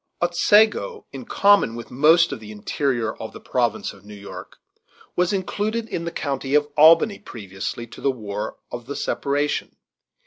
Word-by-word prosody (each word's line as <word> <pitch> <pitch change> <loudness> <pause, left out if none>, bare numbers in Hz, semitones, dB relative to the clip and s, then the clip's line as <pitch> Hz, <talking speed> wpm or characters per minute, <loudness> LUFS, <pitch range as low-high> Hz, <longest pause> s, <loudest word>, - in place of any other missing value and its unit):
Otsego, 215 - +3
in - - -8
common 200 - +3
with 120 - -9
most 160 +6 +5
of - - -5
the 105 -1 -10
interior 115 +1 -2
of 110 - -8
the - - -9
province 120 -4 -1
of 100 -1 -18
New 105 0 -11
York, 100 0 -10 0.6
was 180 0 +2
included 210 +4 -2
in 170 - -4
the 170 - -3
county 140 -2 -2
of 150 0 +3
Albany 165 +7 +6
previously 105 - -6
to 115 - -13
the 140 - +2
war 105 -4 -4
of 120 -1 -7
the 145 - -5
separation. 145 +1 -1
140 Hz, 165 wpm, -23 LUFS, 110-175 Hz, 0.6 s, Albany